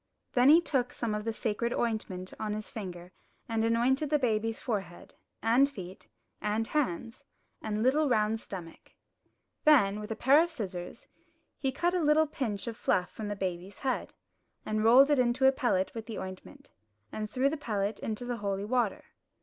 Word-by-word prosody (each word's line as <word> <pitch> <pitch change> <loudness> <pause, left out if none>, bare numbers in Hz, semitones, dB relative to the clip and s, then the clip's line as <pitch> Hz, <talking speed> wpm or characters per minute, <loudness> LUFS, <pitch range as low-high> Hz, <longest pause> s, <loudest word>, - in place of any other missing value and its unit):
Then 250 +2 +5
he 320 +3 +9
took 260 -7 0
some 230 -3 -2
of 210 0 -3
the 225 - 0
sacred 225 +1 -2
ointment 205 -6 -2
on 215 -1 -2
his 215 0 -6
finger 180 -4 -7 0.4
and 225 -1 0
anointed 245 +6 +2
the 300 - +3
baby's 225 -4 0
forehead, 195 -7 -5 0.3
and 250 +5 +4
feet, 190 -9 -10 0.3
and 215 +2 0
hands, 230 - -2 0.4
and 215 0 -2
little 285 +4 +3
round 220 -1 +2
stomach. 175 -6 -10 0.7
Then, 210 -10 +5
with 210 - -7
a 220 - -2
pair 275 +7 +5
of 340 - 0
scissors, 190 - -6 0.5
he 270 -2 0
cut 345 +6 0
a 365 - +1
little 305 +1 +4
pinch 240 -9 -3
of 235 -2 -4
fluff 180 -4 0
from 215 - -6
the 205 - -3
baby's 185 0 -4
head, 260 - -2 0.5
and 215 0 -1
rolled 260 +6 +7
it 290 - +4
into 250 +2 +2
a 265 - +8
pellet 195 -8 0
with 225 -1 -7
the 225 - -5
ointment, 190 +9 -9 0.4
and 215 -1 -4
threw 260 +3 +1
the 295 - 0
pellet 210 -7 -2
into 225 +2 -4
the 245 -1 -3
holy 200 -2 -2
water. 235 -2 0
225 Hz, 180 wpm, -30 LUFS, 205-265 Hz, 0.7 s, he